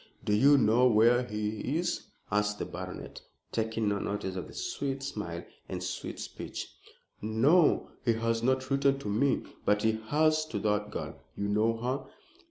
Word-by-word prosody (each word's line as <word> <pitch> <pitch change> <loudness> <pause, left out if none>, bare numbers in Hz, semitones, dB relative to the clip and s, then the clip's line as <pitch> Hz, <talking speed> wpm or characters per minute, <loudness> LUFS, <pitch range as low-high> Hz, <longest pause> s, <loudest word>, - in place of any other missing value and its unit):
"Do 105 - +2
you 140 +7 +6
know 125 0 +5
where 120 +2 +5
he 105 +5 -2
is?" 175 +1 -2 0.2
asked 105 0 +1
the - - -3
baronet, - - -7 0.3
taking 110 -1 -1
no 100 0 +1
notice 100 -2 -3
of 95 - -4
the - - -13
sweet 140 - -3
smile 105 -11 -4 0.3
and - - -4
sweet - - -4
speech. - - -6 0.5
"No, 130 - +3
he 115 - +3
has 115 0 0
not 130 +2 +1
written 135 0 +3
to 135 - -7
me." 115 +7 +2 0.2
"But 105 0 +2
he 110 0 +2
has 155 +3 +3
to 155 - -3
that 105 -1 +1
girl. - - -6
You 100 0 -2
know 110 +2 +2
her?" 130 +4 -2
115 Hz, 170 wpm, -30 LUFS, 105-135 Hz, 0.5 s, you